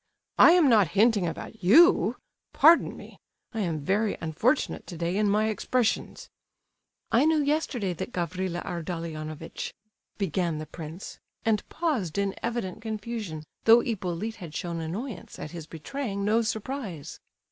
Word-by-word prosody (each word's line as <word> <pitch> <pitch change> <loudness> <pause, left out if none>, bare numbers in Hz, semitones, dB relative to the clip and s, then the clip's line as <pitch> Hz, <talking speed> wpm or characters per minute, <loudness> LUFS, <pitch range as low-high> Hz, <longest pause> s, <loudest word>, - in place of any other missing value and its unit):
I 335 - +9
am 350 -5 +5
not 215 -7 +5
hinting 210 -4 +4
about 190 +5 -7
you; 320 - +6 0.4
pardon 335 +1 +5
me! - - -13 0.3
I 225 - -3
am 165 -7 -1
very 205 +4 +1
unfortunate 190 - 0
today 170 0 -3
in 210 0 +2
my 215 +2 +2
expressions." 230 +2 -1 0.8
"I 240 - +4
knew 320 0 +4
yesterday 280 - 0
that 175 - -6
Gavrila 180 0 -3
Ardalionovitch—" 165 -2 -5 0.4
began 175 -4 -1
the 155 - -5
prince, 160 +3 -9 0.3
and 220 -2 +1
paused 255 - -1
in 200 -1 0
evident 230 -6 -3
confusion, 215 -7 -5 0.2
though 230 +1 +8
Hippolyte 215 0 -3
had 170 -6 -9
shown 170 -3 -3
annoyance 185 +5 -6
at 150 - -7
his 165 -3 -8
betraying 200 - -4
no 220 +3 +3
surprise. 220 - -4
200 Hz, 135 wpm, -27 LUFS, 170-230 Hz, 0.8 s, I